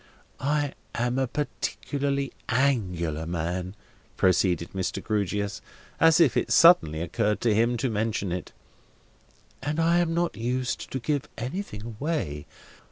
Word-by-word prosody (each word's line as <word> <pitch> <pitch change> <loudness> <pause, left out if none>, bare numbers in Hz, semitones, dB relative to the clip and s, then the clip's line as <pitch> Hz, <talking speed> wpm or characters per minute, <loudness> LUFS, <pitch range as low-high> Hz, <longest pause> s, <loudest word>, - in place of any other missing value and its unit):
I 145 0 0 0.2
am 120 +2 0
a 130 - +1
particularly 140 0 -2 0.2
Angular 90 - 0
man," 90 +3 -3 0.4
proceeded 90 -2 +2
Mr. 95 -1 -2
Grewgious, 100 -2 -2 0.4
as 165 0 +6
if 160 -7 +5
it - - +1
suddenly 80 - +6
occurred 105 +4 0
to 115 -3 +3
him 115 +3 +2
to 130 - 0
mention 110 -4 -1
it, 90 +1 -4 1.1
"and 145 +3 -2
I 170 +1 +4
am 165 -1 +1
not 170 0 0
used 125 +2 -2
to - - -3
give 145 +3 -2
anything 125 - -5
away. 110 - -3
120 Hz, 130 wpm, -26 LUFS, 95-145 Hz, 1.1 s, as